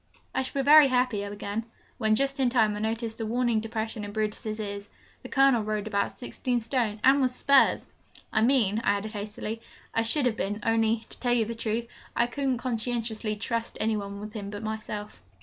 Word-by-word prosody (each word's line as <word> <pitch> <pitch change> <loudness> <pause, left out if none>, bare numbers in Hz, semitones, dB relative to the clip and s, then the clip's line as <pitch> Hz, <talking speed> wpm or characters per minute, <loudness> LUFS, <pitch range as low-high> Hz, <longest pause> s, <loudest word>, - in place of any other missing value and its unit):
'I - - +1
shall 270 +1 -2
be - - -7
very 300 0 +9
happy,' 250 -5 +1
I 205 - -5
began, 205 +2 -4 0.4
when, 215 0 +3
just 275 +3 0
in 260 -2 +3
time, 220 -4 +3
I - - -4
noticed 225 +1 -2
a - - -1
warning 240 -1 +1
depression 220 0 -4
in 205 - -5
Brutus's 215 0 -2
ears. 200 -1 -5 0.3
The - - -9
Colonel 270 -4 +4
rode 215 -1 -2
about 200 -2 -1
sixteen 250 -1 -2
stone, 225 -2 -1
and 275 +2 +6
with 255 -1 +1
spurs! 280 0 +4 0.5
'I 220 - +3
mean,' 225 -4 +3
I - - +3
added 215 +2 -5
hastily, 210 +2 -5 0.3
'I 225 - +2
should 255 +5 +2
have 230 -3 +1
been 205 +2 -2
only, 225 0 +2
to - - -3
tell 245 -1 +1
you 235 -2 +3
the 230 - -4
truth, 230 0 -2 0.3
I 235 - +3
couldn't 265 +1 -1
conscientiously 230 -2 -2
trust 230 +2 -3
any 220 0 +1
one 200 -1 -5
on 210 +1 -7
him 205 -2 -6
but 205 +2 -7
myself.' 215 - -5
225 Hz, 205 wpm, -27 LUFS, 215-245 Hz, 0.5 s, very